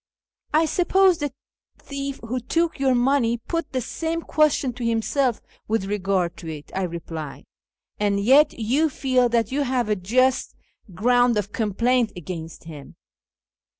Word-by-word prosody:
" - - -70
I 315 +2 +4
suppose 365 +2 +3
the 290 -2 -2 0.5
thief 275 -1 -6
who 255 +3 -2
took 330 +6 -1
your 265 -2 +3
money 245 -2 +2
put 330 +6 -4
the 255 - -1
same 330 +6 -3
question 300 -4 +2
to 245 +1 -7
himself 230 +2 0 0.3
with 220 -3 0
regard 195 -3 -1
to 165 - -9
it," 150 -1 -9
I 190 - -2
replied, 165 -4 -7 0.3
" - - -68
and 205 -1 +1
yet 270 +9 +5
you 260 +8 +1
feel 255 -3 +1
that 230 -1 +1
you 285 +2 0
have 250 -4 0
a 210 - +2
just 255 +8 +1 0.4
ground 245 +3 +3
of 205 0 -2
complaint 230 +3 +1
against 165 -1 -7
him. 150 -4 -11
245 Hz, 155 wpm, -23 LUFS, 205-275 Hz, 0.5 s, yet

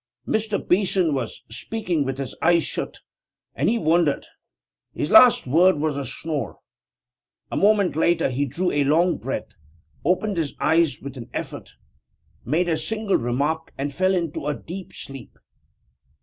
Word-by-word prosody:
6 - - -1
> - - -21
Mr. 205 - -2
Beeson 185 -3 +2
was 130 -5 -4
speaking 180 - -2
with 135 -1 -3
his 135 -2 -5
eyes 170 0 +4
shut, - - -5 0.5
and - - +1
he 235 - +2
wandered. 165 -6 +2 0.7
His 150 - -2
last 235 +2 +7
word 170 +7 +4
was 150 -1 -1
a 140 -2 -4
snore. 145 - -4 0.9
A - - -3
moment 200 -4 +3
later 165 -3 +2
he 140 +3 0
drew 175 +8 -1
a 145 - +2
long 165 +6 +2
breath, 135 - -4 0.5
opened 185 +4 +1
his 155 -4 -2
eyes 165 -2 +2
with 140 -1 -7
an 115 - -9
effort, - - -6 0.7
made 165 +8 +1
a 165 -2 +1
single 215 +5 -1
remark, 140 +7 -1
and 140 +1 -3
fell 185 +4 +2
into 165 -5 -2
a 150 - 0
deep 180 +6 -8
sleep. 135 -4 -10
160 Hz, 160 wpm, -23 LUFS, 140-185 Hz, 0.9 s, last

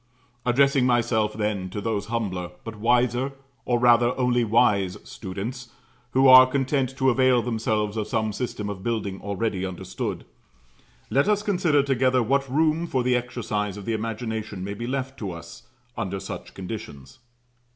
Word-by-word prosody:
Addressing 135 +1 +4
myself 115 -3 +1
then 105 -3 -2
to 105 - -5
those 105 -1 -2
humbler, 100 -6 -3
but 115 -1 -7
wiser, 120 +4 +1 0.3
or 120 - +2
rather, 120 0 +4
only 125 -1 +2
wise 105 -4 +2
students 115 +6 -6 0.4
who 135 +1 +5
are 130 0 +10
content 135 0 -1
to 130 0 +3
avail 130 -1 +3
themselves 110 -3 -1
of 105 - -2
some 110 -1 -1
system 110 -2 -4
of 100 -2 -5
building 100 -4 -3
already 100 -1 -2
understood, 95 -2 -5 0.9
let 140 +2 +3
us 210 -1 +2
consider 175 -8 +2
together 130 -2 +2
what 135 +3 +1
room 160 +3 +2
for 130 -5 0
the 125 0 +2
exercise 110 -5 -2
of 100 - -8
the 115 - -1
imagination 110 -3 -4
may 100 +1 -4
be 115 +4 -5
left 135 +1 -3
to 100 - -4
us 85 +4 -10 0.3
under 95 0 -3
such - - -8
conditions. 90 - -8
115 Hz, 155 wpm, -25 LUFS, 105-130 Hz, 0.9 s, are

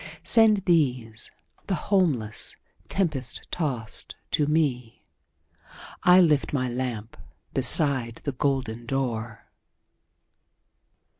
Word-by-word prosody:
Send 215 -4 +5
these, 125 - -1 0.4
the 195 - -1
homeless, 150 - -1 0.3
tempest 150 -10 -2
tost 130 -10 -5 0.2
to 150 - 0 1.6
me,I 180 +1 +7
lift 155 -7 +2
my 130 -3 -1
lamp 120 -3 -5 0.4
beside 130 -2 +5
the 140 - -3
golden 130 -4 -3
door!" 120 -4 -4
135 Hz, 80 wpm, -25 LUFS, 120-160 Hz, 1.6 s, me,I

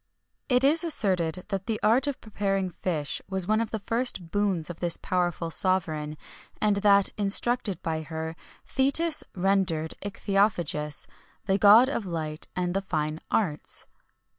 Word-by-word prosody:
It 250 0 +3
is 310 +5 +5
asserted 185 - +1
that 195 -1 -3
the 225 -2 -1
art 235 +6 +3
of 285 - -2
preparing 195 -3 -2
fish 155 -5 -3
was 190 -2 +1
one 215 +1 +2
of 230 - -2
the 220 - -3
first 215 -5 -2
boons 200 -6 0
of 165 - -11
this 175 -1 0
powerful 175 -2 -1
sovereign, 155 -4 +2 0.4
and 210 -1 +2
that, 200 -1 +4
instructed 205 -1 0
by 160 -1 -2
her, 160 0 -5 0.3
Thetis 300 +4 +1
rendered 180 -4 0
ichthyophagist 195 -7 -1 0.4
the 195 0 +1
god 215 +5 +8
of 235 -7 -3
light 155 -3 -3
and 180 -1 -1
the 195 - +1
fine 155 -3 -3
arts. 165 -9 -1
195 Hz, 145 wpm, -27 LUFS, 165-215 Hz, 0.4 s, god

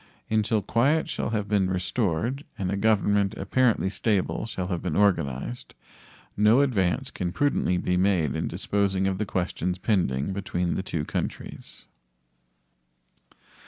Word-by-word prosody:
Until 110 -1 +1
quiet 135 +10 +2
shall - - -2
have 105 -2 -1
been 100 -3 +2
restored 95 - -1
and 95 -1 -2
a - - 0
government 100 -1 +2
apparently 115 +1 +2
stable 100 +1 0
shall 95 -5 -4
have 90 -3 -2
been 85 -5 -2
organized, 70 -12 0 0.6
no 105 +6 +5
advance 100 -11 +1
can 90 -1 -3
prudently 120 -6 +1
be 90 +1 0
made 90 -6 +2
in 80 - -1
disposing 95 +1 0
of 95 0 -1
the 105 - -1
questions 90 -1 -2
pending 90 - 0
between 90 -3 -2
the - - -1
two 80 -5 -3
countries. - - -5
95 Hz, 135 wpm, -26 LUFS, 90-105 Hz, 0.6 s, no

